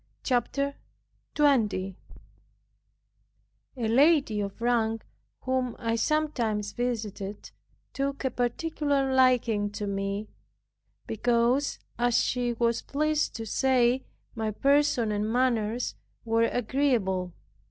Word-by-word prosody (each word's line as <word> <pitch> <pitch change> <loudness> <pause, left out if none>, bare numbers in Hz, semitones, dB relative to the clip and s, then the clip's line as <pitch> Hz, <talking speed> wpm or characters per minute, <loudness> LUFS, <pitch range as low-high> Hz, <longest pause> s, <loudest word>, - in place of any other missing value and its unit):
CHAPTER 280 +2 0 0.6
20 215 -10 +2 1.8
A 230 -3 -1
lady 270 -3 +4
of 200 +1 -5
rank, 225 -2 0 0.4
whom 255 -2 -1
I 230 -1 -1
sometimes 230 -7 0
visited, 215 -5 -4 0.4
took 275 0 -2
a 260 - +1
particular 275 +2 0
liking 240 -5 +3
to 205 0 -4
me, 200 +1 -3 0.8
because 240 +5 +1 0.2
(as 240 -1 +3
she 245 -1 0
was 235 0 0
pleased 305 +1 0
to 225 - -5
say) 255 +2 +2 0.3
my 220 -2 -2
person 275 -1 +2
and 210 +1 -1
manners 240 -2 0 0.3
were 230 0 +3
agreeable. 220 -8 0
240 Hz, 100 wpm, -27 LUFS, 215-265 Hz, 1.8 s, lady